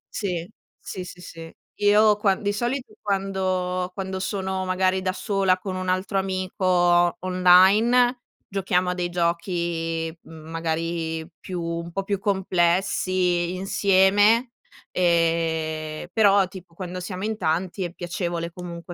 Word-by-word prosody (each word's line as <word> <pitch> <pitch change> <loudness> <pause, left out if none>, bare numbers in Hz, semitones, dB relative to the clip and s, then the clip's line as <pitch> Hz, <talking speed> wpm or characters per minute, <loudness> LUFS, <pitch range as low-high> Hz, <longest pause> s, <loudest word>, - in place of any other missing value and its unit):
Sì, 180 -5 -2 0.3
sì, 185 - -6
sì, 180 0 -11
sì. 165 -2 -10 0.3
Io 210 +1 +5
quan 205 0 +1
di 205 0 0
solito 245 +5 -3
quando 185 -2 -1
quando 190 -1 -4
sono 190 0 -2
magari 185 0 +1
da 185 0 0
sola 195 -1 +1
con 185 0 -5
un 185 0 -3
altro 185 +2 0
amico 185 -2 +2
online, 195 +8 +5 0.3
giochiamo 190 -2 0
a - - -1
dei 180 -1 -2
giochi 170 -1 -2
magari 160 0 -4
più 180 -2 -5
un 170 0 -4
po' 195 +3 -3
più 200 0 -2
complessi 185 -2 +1
insieme; 200 +5 +3 0.4
ehm, 165 -2 0
però 200 -3 +4
tipo 180 -2 -13
quando 185 0 -6
siamo 185 +1 -6
in 220 +1 -1
tanti 180 0 -1
è 175 - -4
piacevole 175 -1 -4
comunque 175 0 -8
185 Hz, 125 wpm, -24 LUFS, 170-195 Hz, 0.4 s, Io